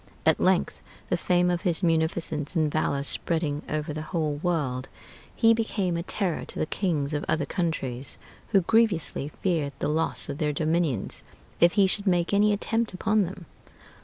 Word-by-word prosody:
At -, -, +4 dB
length -, -, +1 dB, 0.3 s
the -, -, +2 dB
fame 180 Hz, 0 st, +2 dB
of 175 Hz, -1 st, -1 dB
his 180 Hz, -2 st, -1 dB
munificence 160 Hz, -2 st, 0 dB
and 155 Hz, -2 st, +2 dB
valor 140 Hz, -2 st, 0 dB
spreading 150 Hz, 0 st, +1 dB
over 155 Hz, 0 st, -2 dB
the 155 Hz, -, -4 dB
whole 155 Hz, -2 st, -2 dB
world, 145 Hz, -6 st, -2 dB, 0.5 s
he 230 Hz, -1 st, +5 dB
became 205 Hz, -5 st, -1 dB
a 170 Hz, -, -1 dB
terror 180 Hz, -1 st, -2 dB
to -, -, -7 dB
the -, -, 0 dB
kings 155 Hz, -5 st, -1 dB
of 150 Hz, -, -1 dB
other 155 Hz, -2 st, +1 dB
countries, 135 Hz, -7 st, +1 dB, 0.3 s
who 195 Hz, -, +3 dB
grievously 195 Hz, -8 st, +1 dB, 0.2 s
feared 160 Hz, -7 st, 0 dB
the -, -, -2 dB
loss 160 Hz, +2 st, 0 dB
of 145 Hz, 0 st, -5 dB
their 150 Hz, -2 st, 0 dB
dominions 155 Hz, -, -1 dB, 0.4 s
if 170 Hz, +1 st, +5 dB
he 200 Hz, -2 st, +5 dB
should 200 Hz, +2 st, -1 dB
make 175 Hz, 0 st, +2 dB
any 210 Hz, +1 st, +4 dB
attempt 225 Hz, 0 st, -1 dB
upon 215 Hz, +1 st, +2 dB
them.... 180 Hz, 0 st, -8 dB
165 Hz, 170 wpm, -26 LUFS, 150-185 Hz, 0.5 s, he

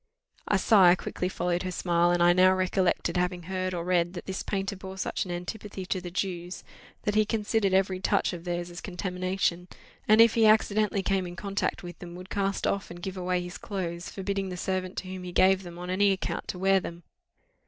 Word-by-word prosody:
A 205 Hz, -, +3 dB
sigh 190 Hz, -3 st, +6 dB
quickly 180 Hz, 0 st, -3 dB
followed 180 Hz, -1 st, -1 dB
her 185 Hz, -, -3 dB
smile, 175 Hz, -1 st, +2 dB
and 175 Hz, 0 st, +3 dB
I 175 Hz, 0 st, +6 dB
now 185 Hz, +1 st, +5 dB
recollected 185 Hz, -1 st, +1 dB
having 180 Hz, 0 st, -1 dB
heard 185 Hz, +1 st, -2 dB
or 170 Hz, -, -3 dB
read 175 Hz, -1 st, +1 dB
that 175 Hz, -, -7 dB
this 190 Hz, 0 st, -4 dB
painter 195 Hz, 0 st, -2 dB
bore 190 Hz, 0 st, -9 dB
such 190 Hz, -, -2 dB
an 180 Hz, -, -6 dB
antipathy 190 Hz, +2 st, -6 dB
to 185 Hz, 0 st, -2 dB
the 175 Hz, -, -6 dB
Jews, 180 Hz, -1 st, -4 dB, 0.4 s
that 210 Hz, -, 0 dB
he 215 Hz, +1 st, +4 dB
considered 215 Hz, -1 st, 0 dB
every 190 Hz, 0 st, +2 dB
touch 195 Hz, 0 st, +1 dB
of 170 Hz, -1 st, -7 dB
theirs 175 Hz, 0 st, -3 dB
as 175 Hz, -, -8 dB
contamination; 180 Hz, -1 st, -2 dB, 0.4 s
and, 215 Hz, +1 st, +6 dB
if 230 Hz, -1 st, +7 dB
he 225 Hz, -1 st, +5 dB
accidentally 215 Hz, -2 st, +3 dB
came 190 Hz, -1 st, 0 dB
in 175 Hz, -, -8 dB
contact 200 Hz, 0 st, -2 dB
with 175 Hz, -1 st, -9 dB
them, 175 Hz, -1 st, -9 dB
would 185 Hz, +1 st, -10 dB
cast 195 Hz, -1 st, -1 dB
off 200 Hz, -, -1 dB
and 175 Hz, 0 st, -10 dB
give 190 Hz, -1 st, -4 dB
away 180 Hz, -1 st, -1 dB
his 175 Hz, 0 st, -8 dB
clothes, 175 Hz, -5 st, -4 dB
forbidding 195 Hz, 0 st, -3 dB
the 180 Hz, -, -5 dB
servant 185 Hz, +1 st, -3 dB
to 185 Hz, -, -4 dB
whom 185 Hz, 0 st, -6 dB
he 180 Hz, -, -6 dB
gave 190 Hz, +2 st, +4 dB
them, 175 Hz, -2 st, -10 dB
on 180 Hz, +1 st, -5 dB
any 200 Hz, +2 st, +3 dB
account 190 Hz, -, -3 dB
to -, -, -4 dB
wear 195 Hz, +1 st, +3 dB
them. 170 Hz, -1 st, -8 dB
185 Hz, 215 wpm, -28 LUFS, 175-195 Hz, 0.4 s, if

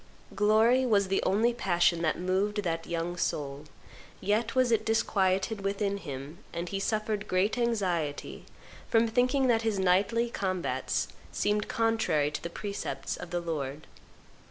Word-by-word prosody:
Glory 220 Hz, +5 st, +4 dB
was 205 Hz, -6 st, +2 dB
the 195 Hz, -, +2 dB
only 225 Hz, +5 st, +3 dB
passion 175 Hz, -6 st, +2 dB
that 160 Hz, -2 st, +1 dB
moved 195 Hz, +3 st, 0 dB
that 165 Hz, -2 st, -2 dB
young 170 Hz, +1 st, -2 dB
soul; 145 Hz, -3 st, -2 dB, 0.5 s
yet 215 Hz, +4 st, 0 dB
was 255 Hz, -2 st, +3 dB
it 220 Hz, -1 st, +3 dB
disquieted 200 Hz, -2 st, +1 dB
within 200 Hz, 0 st, -1 dB
him, 145 Hz, -1 st, -7 dB
and 170 Hz, +1 st, -4 dB
he 195 Hz, -, -2 dB
suffered 215 Hz, 0 st, -1 dB
great 185 Hz, +3 st, +1 dB
anxiety 185 Hz, -11 st, -1 dB, 0.4 s
from 230 Hz, 0 st, +4 dB
thinking 250 Hz, +4 st, +2 dB
that 235 Hz, -3 st, +3 dB
his 220 Hz, -3 st, 0 dB
knightly 195 Hz, +6 st, +2 dB
combats 190 Hz, -5 st, -2 dB, 0.2 s
seemed 210 Hz, 0 st, 0 dB
contrary 220 Hz, -10 st, +1 dB
to -, -, -4 dB
the 170 Hz, -, -5 dB
precepts 170 Hz, -8 st, -4 dB
of 175 Hz, -, -8 dB
the 175 Hz, -, -1 dB
Lord. 150 Hz, -4 st, -4 dB
200 Hz, 145 wpm, -29 LUFS, 170-225 Hz, 0.5 s, Glory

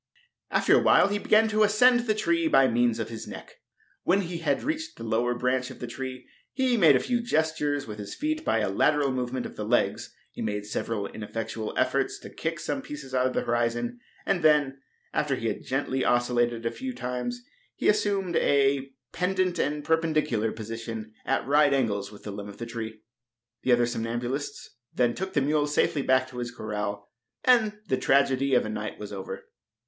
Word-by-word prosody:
After -, -, +4 dB
awhile -, -, +5 dB
he 205 Hz, 0 st, -1 dB
began 215 Hz, +2 st, +4 dB
to 215 Hz, 0 st, +1 dB
ascend 245 Hz, +4 st, +5 dB
the 215 Hz, -, +2 dB
tree 330 Hz, +9 st, +1 dB
by 135 Hz, -, +5 dB
means 120 Hz, -1 st, +2 dB
of -, -, -3 dB
his 115 Hz, -1 st, -7 dB
neck. -, -, -10 dB, 0.4 s
When 195 Hz, +3 st, +2 dB
he 170 Hz, -2 st, -4 dB
had 145 Hz, -4 st, 0 dB
reached 315 Hz, +1 st, -3 dB
the 115 Hz, -, -8 dB
lower 120 Hz, +2 st, 0 dB
branch 125 Hz, +1 st, 0 dB
of -, -, -10 dB
the -, -, -5 dB
tree 130 Hz, +1 st, -6 dB, 0.2 s
he 260 Hz, -2 st, +1 dB
made 165 Hz, -, +6 dB
a -, -, +4 dB
few 240 Hz, -, 0 dB
gestures 155 Hz, -, 0 dB
with 105 Hz, -1 st, -8 dB
his 100 Hz, -, -6 dB
feet 310 Hz, +2 st, -2 dB
by 115 Hz, -, +1 dB
a 105 Hz, -, 0 dB
lateral 145 Hz, +7 st, +2 dB
movement 125 Hz, 0 st, -2 dB
of -, -, -9 dB
the 105 Hz, -, -3 dB
legs. 120 Hz, +3 st, 0 dB, 0.2 s
He -, -, -8 dB
made 105 Hz, -1 st, -2 dB
several 105 Hz, 0 st, -3 dB
ineffectual 110 Hz, +1 st, -5 dB
efforts -, -, +1 dB
to -, -, -10 dB
kick -, -, -3 dB
some -, -, -3 dB
pieces 140 Hz, -3 st, -9 dB
out 130 Hz, 0 st, +3 dB
of 130 Hz, -, -3 dB
the -, -, 0 dB
horizon, 120 Hz, 0 st, -1 dB, 0.3 s
and 195 Hz, -3 st, +1 dB
then, 145 Hz, -3 st, +3 dB, 0.3 s
after 145 Hz, -2 st, +1 dB
he 115 Hz, -2 st, -2 dB
had 105 Hz, -, -5 dB
gently 130 Hz, 0 st, -1 dB
oscilliated 120 Hz, -1 st, +1 dB
a 115 Hz, -, +1 dB
few 260 Hz, -1 st, -5 dB
times, 125 Hz, -, -4 dB, 0.3 s
he -, -, -1 dB
assumed 200 Hz, -4 st, +1 dB
a 140 Hz, -1 st, +2 dB, 0.2 s
pendent 185 Hz, -1 st, 0 dB
and 150 Hz, 0 st, -1 dB
perpendicular 155 Hz, -9 st, +1 dB
position 115 Hz, 0 st, -6 dB
at -, -, +1 dB
right 145 Hz, +1 st, +4 dB
angles 100 Hz, -6 st, -1 dB
with 105 Hz, -, -14 dB
the 105 Hz, -, -5 dB
limb 100 Hz, 0 st, -7 dB
of 100 Hz, -, -11 dB
the 115 Hz, -, -5 dB
tree. 110 Hz, -2 st, -6 dB, 0.6 s
The 130 Hz, -, +1 dB
other 120 Hz, 0 st, +5 dB
somnambulists 120 Hz, +4 st, -3 dB, 0.2 s
then 120 Hz, -1 st, +2 dB
took 190 Hz, +5 st, -5 dB
the 145 Hz, -, +2 dB
mule 150 Hz, +1 st, +1 dB
safely 150 Hz, 0 st, +1 dB
back 130 Hz, -1 st, +2 dB
to 125 Hz, -, -7 dB
his 120 Hz, 0 st, -3 dB
corral, 105 Hz, -3 st, -5 dB, 0.3 s
and 225 Hz, -4 st, +4 dB
the 130 Hz, -, +1 dB
tragedy 135 Hz, 0 st, +3 dB
of -, -, +3 dB
a -, -, -4 dB
night 105 Hz, 0 st, -4 dB
was 105 Hz, -1 st, -8 dB
over. 95 Hz, -1 st, -6 dB
130 Hz, 195 wpm, -27 LUFS, 115-160 Hz, 0.6 s, made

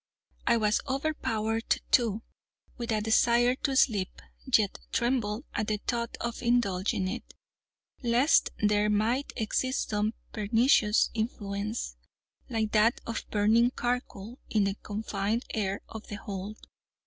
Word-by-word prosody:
I 235 Hz, -, +5 dB
was 215 Hz, -1 st, +2 dB
overpowered, 230 Hz, -6 st, -1 dB
too, 225 Hz, -3 st, +3 dB, 0.5 s
with 235 Hz, -2 st, -4 dB
a 215 Hz, -1 st, +1 dB
desire 235 Hz, +3 st, +4 dB
to 275 Hz, -1 st, -1 dB
sleep, 210 Hz, -8 st, +2 dB, 0.3 s
yet 215 Hz, -4 st, +3 dB
trembled 240 Hz, -2 st, 0 dB
at 215 Hz, -, -1 dB
the 215 Hz, -, 0 dB
thought 235 Hz, +2 st, -3 dB
of 235 Hz, -1 st, -4 dB
indulging 200 Hz, -6 st, +1 dB
it, 185 Hz, -, -6 dB, 0.7 s
lest 245 Hz, +5 st, +4 dB
there 210 Hz, 0 st, +2 dB
might 225 Hz, +6 st, +1 dB
exist 255 Hz, +3 st, -1 dB
some 210 Hz, +1 st, 0 dB, 0.2 s
pernicious 220 Hz, 0 st, +3 dB
influence, 210 Hz, -, -3 dB, 0.5 s
like 220 Hz, -3 st, -1 dB
that 220 Hz, +2 st, +3 dB
of 230 Hz, -, -4 dB
burning 225 Hz, +4 st, +3 dB
charcoal, 240 Hz, -2 st, -3 dB
in 215 Hz, -2 st, +2 dB
the 195 Hz, 0 st, +1 dB
confined 210 Hz, +2 st, -2 dB
air 200 Hz, -3 st, -1 dB
of 220 Hz, -1 st, -9 dB
the 205 Hz, -, -5 dB
hold. 200 Hz, +1 st, -6 dB
220 Hz, 125 wpm, -29 LUFS, 210-240 Hz, 0.7 s, I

